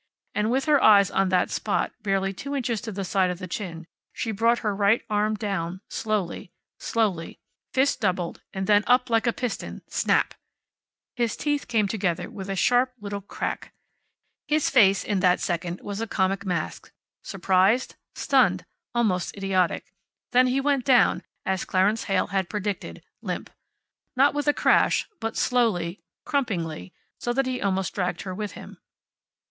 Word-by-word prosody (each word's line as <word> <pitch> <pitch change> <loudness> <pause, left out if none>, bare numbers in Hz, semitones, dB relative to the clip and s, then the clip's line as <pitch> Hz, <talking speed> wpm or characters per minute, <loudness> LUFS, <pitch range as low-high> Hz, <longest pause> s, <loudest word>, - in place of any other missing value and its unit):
And 210 +1 0
with 265 +3 +1
her 295 -3 +4
eyes 200 -3 +6
on 195 -1 +2
that 185 -1 +2
spot - - -1
barely 195 -1 0
two 280 +7 -5
inches 240 -5 -1
to 225 - -5
the 195 -1 -4
side 185 0 +2
of 180 - -3
the 185 - -6
chin 170 -3 -5 0.3
she 225 - -3
brought 230 +3 +2
her 210 -2 +1
right 200 +3 +3
arm 210 +1 +1
down, 190 -4 -3
slowly, 210 -6 -2 0.3
slowly, 200 -8 -1 0.3
fist 265 0 +1
doubled, 180 -4 -1
and 190 0 -3
then 205 +1 +4
up 250 0 +3
like 225 +1 +2
a - - +4
piston 245 -1 -5
snap! - - +1 0.8
His 235 -3 -1
teeth 290 -1 -1
came 215 -3 +2
together 190 -5 -2
with 195 -1 -7
a 195 - -1
sharp 250 +6 +3
little 205 -1 -5
crack. 200 - -5 0.7
His 300 0 +1
face, 200 -7 +5
in 205 -2 -1
that 180 -1 +3
second, 175 0 -3
was 205 +1 -5
a 225 - -2
comic 195 -1 0
mask, 175 -4 -3 0.3
surprised, 195 +5 +2 0.2
stunned, - - +2 0.3
almost 205 -6 0
idiotic. 190 -3 0 0.4
Then 255 +1 +5
he 255 +2 +1
went 275 -1 +1
down, 250 -2 +4 0.2
as 190 -1 0
Clarence 200 +4 +1
Heyl 195 - +1
had 190 -2 0
predicted, 205 -1 -4 0.2
limp. - - -5 0.6
Not 275 +3 +4
with 290 0 -2
a - - +7
crash, - - +3
but 225 0 -3
slowly, 205 -8 +1 0.2
crumpingly, 185 - -2 0.3
so 240 - -1
that 270 +2 +1
he 255 -1 -2
almost 190 -1 0
dragged 180 -3 -2
her 185 - -5
with 210 +2 -5
him. - - -11
205 Hz, 165 wpm, -25 LUFS, 190-240 Hz, 0.8 s, a